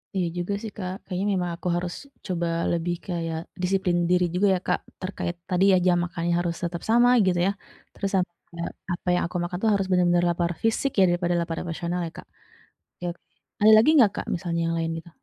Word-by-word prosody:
Iya 180 -2 +1
juga 175 +3 -2
sih 220 -2 -6
Kak. 185 -2 -4
Kayaknya 185 +1 -2
memang 180 -2 -1
aku 170 - -6
harus 175 0 -2 0.3
coba 175 -3 -1 0.2
lebih 170 +1 -1
kayak 165 -2 -2 0.2
disiplin 180 -1 +1
diri 180 0 +4
juga 200 +3 +3
ya 180 - -1
Kak, - - +2 0.2
terkait 185 -2 -3
tadi 180 +1 +2
ya 185 - +6
jam 175 -1 +4
makannya 170 0 -2
harus 170 -1 -1
tetap 170 0 -3
sama, 240 +2 +5 0.2
gitu 180 -2 +2
ya. - - +3 0.4
Terus 195 - -3
sama 180 -2 +1 0.2
kayak, 170 0 -5 0.2
apa 175 - -8
yang - - +1
aku 180 - -14
makan 175 +1 -3
itu 225 - +3
harus 195 -1 0
bener-bener 175 -1 +3
lapar 170 0 0
fisik 225 +5 +1
ya - - +7
daripada 175 0 +1
lapar 165 -1 -3
emosional 175 +1 -3
ya - - -9
Kak? - - -10 0.7
Oke 180 - -8
oke. 170 - -15 0.4
Ada 215 +1 +7
lagi 225 +7 +5
nggak 215 -7 +6
Kak, - - -4
misalnya 170 -1 -2
yang 165 0 0
lain 165 0 -1
gitu? 170 +1 -9
175 Hz, 215 wpm, -25 LUFS, 170-190 Hz, 0.7 s, ya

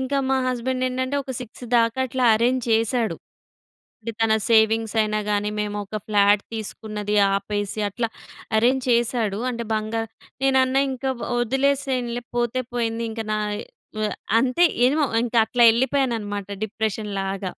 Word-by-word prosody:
ఇంక 265 +1 -4 0.2
మా 265 - +3
హస్బండ్ 255 +1 -1
ఏంటంటే, 260 +2 -2
ఒక 260 - -5
6 245 +1 -9
దాకా 230 +2 +1
అట్లా 255 +1 -1
అరేంజ్ 245 +2 +1
చేసాడు. 225 +1 +1 0.8
అంటే, 230 +1 -5
తన 225 -1 +3 0.2
సేవింగ్స్ 220 0 +3
అయినా 215 0 0
గాని, 205 0 0
మేము 210 0 -3
ఒక 215 +2 -6
ఫ్లాట్ 205 -1 +4
తీసుకున్నది 210 -1 -4 0.2
ఆపేసి, 205 +1 -2
అట్లా 230 +3 -2 0.5
అరేంజ్ 250 +3 +2
చేసాడు. 235 -3 +1
అంటే, 235 -1 -4
బంగా 215 +1 -1 0.4
నేనన్నా 265 0 +3
ఇంక 260 +1 -8 0.4
వదిలేసేయండిలే 255 -1 0
పోతే 240 +2 0
పోయింది. 230 -1 -1
ఇంక, 225 - -4
నా - - 0 0.6
వె 215 - +1 0.3
అంతే 265 +8 +3 0.2
ఏమో 295 +4 +2 0.2
ఇంక 240 0 -4
అట్లా 240 +1 +3
ఎళ్ళిపోయాను 260 +1 +1
అన్నమాట, 205 -1 -5 0.2
డిప్రెషన్ 215 -1 -3
లాగా. 195 -1 -3
230 Hz, 140 wpm, -23 LUFS, 215-255 Hz, 0.8 s, ఫ్లాట్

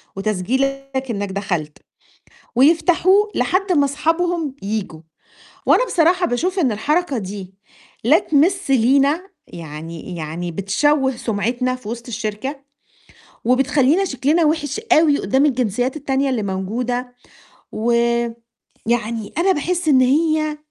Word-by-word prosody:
وتسجيلك 265 +7 -2
إنك 200 -3 -3
دخلت، 175 -6 -3 0.8
ويفتحوه 345 - +4
لحد 380 +1 0
ما 285 -3 +3
صحابهم 325 0 -1
ييجوا، 200 -6 -4 0.7
وأنا - - +4
بصراحة 355 -1 +2
باشوف 360 +10 -1
إن 260 -10 +2
الحركة 295 +5 0
دي 190 -1 -7 0.5
لا 300 +8 +6
تمس 330 +2 +1
لينا 275 +6 +3 0.3
يعني 165 +2 -8
يعني 165 +2 -5
بتشوه 265 - +1
سُمعتنا 240 +4 -1
في 215 -4 -11
وسط 235 +1 -6
الشركة، 220 +5 -4 0.9
وبتخلّينا 275 +7 +3
شكلنا 305 +2 +1
وِحِش 300 +4 -1
أوي 305 -2 +4
قدَّام 265 +9 +2
الجنسيات 250 0 0
التانية 275 -1 0
اللي 235 -5 -1
موجودة، 240 +6 -3 0.6
و 235 +2 0 1.0
يعني 225 -2 -1
أنا 380 +3 +3
باحِسّ 345 +3 -2
إن 260 -3 +5
هي 310 +3 +1
265 Hz, 115 wpm, -20 LUFS, 215-310 Hz, 1.0 s, لا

